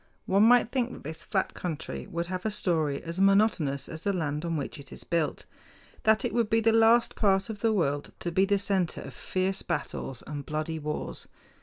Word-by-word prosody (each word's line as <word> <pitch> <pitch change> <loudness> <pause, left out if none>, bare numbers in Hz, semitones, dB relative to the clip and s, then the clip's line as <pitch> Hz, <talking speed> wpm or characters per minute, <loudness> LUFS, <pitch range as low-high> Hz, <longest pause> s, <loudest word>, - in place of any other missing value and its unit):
One 195 +2 +3
might 235 +1 +5
think 250 -2 0
that - - -11
this 160 +2 -4
flat 190 +2 -1
country 165 -5 -5
would 170 0 -3
have 180 +1 -4
a 220 - 0
story 160 -8 0
as 170 +2 -5
monotonous 195 -9 +3
as 160 -1 -8
the 200 - 0
land 150 -5 -2
on 165 -1 -1
which 145 +2 -4
it 140 -2 -11
is - - -5
built, 165 -3 -1 0.6
that 220 +3 +4
it 245 - -2
would 235 -3 +1
be 225 - +3
the 225 0 +3
last 225 +1 +5
part 195 0 +2
of 210 - -8
the 225 +1 +2
world 145 -8 0
to 175 - -2
be 190 +3 +3
the 200 0 +2
center 190 -4 -1
of - - -9
fierce 190 +1 -2
battles 135 - -4
and 145 -1 -5
bloody 155 +2 -3
wars. 150 0 -5
185 Hz, 210 wpm, -28 LUFS, 155-215 Hz, 0.6 s, might